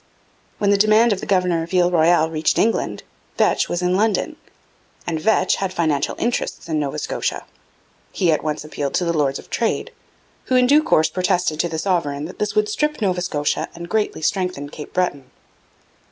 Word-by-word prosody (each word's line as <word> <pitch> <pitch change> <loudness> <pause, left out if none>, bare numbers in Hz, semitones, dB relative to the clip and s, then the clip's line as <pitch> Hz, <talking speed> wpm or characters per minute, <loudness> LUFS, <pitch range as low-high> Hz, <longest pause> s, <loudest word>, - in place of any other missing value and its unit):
When 200 -1 +2
the 200 - +3
demand 215 +2 +5
of 195 - -4
the - - -7
governor 180 -3 +2
of 165 - -7
Ile 180 0 +3
Royale 165 -1 +3
reached 155 -1 0
England, 225 +1 0 0.3
Vetch - - +2
was 175 +1 -2
in 180 0 +2
London; 220 - 0 0.7
and 165 -2 -2
Vetch 200 -1 +2
had 195 -1 -2
financial 155 -6 0
interests 240 -6 -2
in 160 -2 -1
Nova 140 -2 -3
Scotia. - - -3 0.7
He 175 -3 +1
at 155 - 0
once 150 -1 -2
appealed 145 -2 -4
to 180 - +1
the 170 - 0
Lords 140 -3 +1
of - - -14
Trade, 230 -1 -1 0.5
who 255 - 0
in 250 0 +5
due 290 +4 +5
course 160 - +2
protested 180 -3 0
to 170 - +1
the 160 - -4
sovereign 155 -5 -1
'that 175 - -10
this 210 -1 -2
would 215 0 +2
strip 300 +8 -1
Nova 185 -5 0
Scotia 150 -5 -1
and 170 0 -7
greatly 215 -6 -1
strengthen 180 -5 -1
Cape 150 0 -9
Breton.' 145 -8 -2
180 Hz, 190 wpm, -21 LUFS, 155-205 Hz, 0.7 s, demand